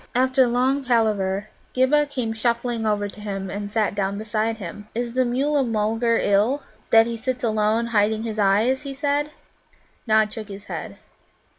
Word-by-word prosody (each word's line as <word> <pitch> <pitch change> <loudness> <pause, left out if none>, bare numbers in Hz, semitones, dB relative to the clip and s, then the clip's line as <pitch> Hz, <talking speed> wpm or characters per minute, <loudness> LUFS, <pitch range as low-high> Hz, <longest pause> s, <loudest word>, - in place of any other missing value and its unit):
After 260 0 +3
long 255 +3 +1
palaver, 215 -5 +1 0.3
Ghibba 290 +3 +3
came 250 -6 -3
shuffling 235 0 -1
over 205 -1 0
to 205 +1 -11
him, 195 -2 -4
and 205 0 -4
sat 215 -1 0
down 200 0 -1
beside 220 +1 -1
him. 205 +1 -8
"Is 240 0 -2
the 255 +1 +2
Mulla 275 +4 +1
mulgar 225 0 +1
ill, 215 +8 +2 0.3
that 225 0 +6
he 235 0 -3
sits 250 +2 -3
alone, 220 0 +1
hiding 215 +1 +2
his 220 -2 -4
eyes?" 215 +7 +3
he 275 -2 -7
said. 290 +1 0 0.8
Nod 215 -1 +3
shook 220 -2 -7
his 200 -1 -9
head. - - -6
225 Hz, 165 wpm, -23 LUFS, 210-255 Hz, 0.8 s, that